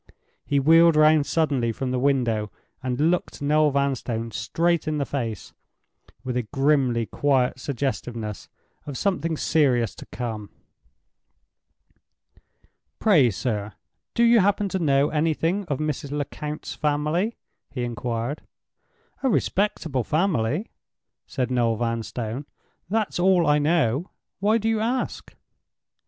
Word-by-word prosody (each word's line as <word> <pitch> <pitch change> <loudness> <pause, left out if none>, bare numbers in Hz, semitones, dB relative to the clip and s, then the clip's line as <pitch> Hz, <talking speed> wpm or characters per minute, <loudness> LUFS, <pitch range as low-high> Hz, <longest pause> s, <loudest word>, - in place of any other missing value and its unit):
He 140 - +1
wheeled 165 +3 +6
round 155 -1 +5
suddenly 140 -8 +1
from 130 +3 -3
the 125 - 0
window, 120 -6 +1 0.3
and 135 +5 +1
looked 180 - -2
Noel 150 +1 +3
Vanstone 130 -5 -1
straight 165 +10 0
in 155 -1 0
the 140 - 0
face 115 -8 -4 0.7
with 125 -1 -3
a 125 - +1
grimly 135 -1 +1
quiet 130 0 +1
suggestiveness 120 -5 -4 0.4
of 140 -3 -5
something 165 -5 -1
serious 130 -9 +2
to - - -12
come. 110 -4 -5 2.5
"Pray, 160 - +4
sir, 105 0 -3 0.4
do 235 - +3
you 235 0 +6
happen 205 +1 +2
to 190 - -2
know 140 -3 +3
anything 165 +5 0
of 145 -6 -2
Mrs. 150 -1 -3
Lecount's 150 +1 -5
family?" 155 +8 0 0.3
he 125 -3 -4
inquired. 120 +3 -3 0.8
"A 270 - +2
respectable 170 - 0
family," 155 - 0 0.6
said 130 -2 -2
Noel 120 -2 +2
Vanstone—"that's 120 - -4
all 180 -1 +4
I 150 0 +4
know. 150 - +1 0.3
Why 210 +3 +3
do 220 0 -2
you 225 -1 +1
ask?" 240 +4 -2
145 Hz, 120 wpm, -24 LUFS, 120-165 Hz, 2.5 s, wheeled